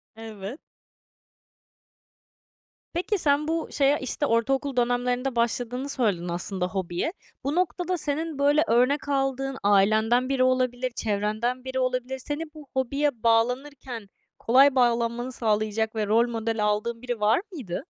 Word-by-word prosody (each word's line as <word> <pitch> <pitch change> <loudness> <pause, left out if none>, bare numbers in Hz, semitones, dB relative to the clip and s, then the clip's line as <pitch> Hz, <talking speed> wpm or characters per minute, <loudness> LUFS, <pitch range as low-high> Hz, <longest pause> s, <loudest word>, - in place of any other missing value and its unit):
Evet. 220 +3 -8 2.3
Peki, 360 +4 0
sen 295 -2 +2
bu 330 0 -1
şeye, 280 +1 +3
işte, 260 +3 -1
ortaokul 270 +3 +1
dönemlerinde 245 +1 0
başladığını 245 +3 -1
söyledin, 205 -10 0
aslında, 180 +1 -2
hobiye. 185 - -2 0.3
Bu 280 +3 -1
noktada, 360 0 0
senin, 310 0 -3
böyle, 290 +2 +4
örnek 255 +5 +2
aldığın 270 -1 -1
ailenden 220 +5 +3
biri 265 -2 +2
olabilir, 255 0 +1
çevrenden 215 +4 -1
biri 260 0 -2
olabilir. 255 +1 -1
Seni 290 +4 -4
bu 300 -3 -12
hobiye 265 -1 -1
bağlanırken 245 -1 0 0.3
kolay 270 +4 +5
bağlanmanı 240 0 +1
sağlayacak 220 -1 0
ve 210 -2 -1
rol 230 +3 +3
modeli 225 -1 -2
aldığın 215 +3 -1
biri 245 -2 -4
var 215 +7 +3
mıydı? 235 - -5
250 Hz, 125 wpm, -26 LUFS, 225-275 Hz, 2.3 s, kolay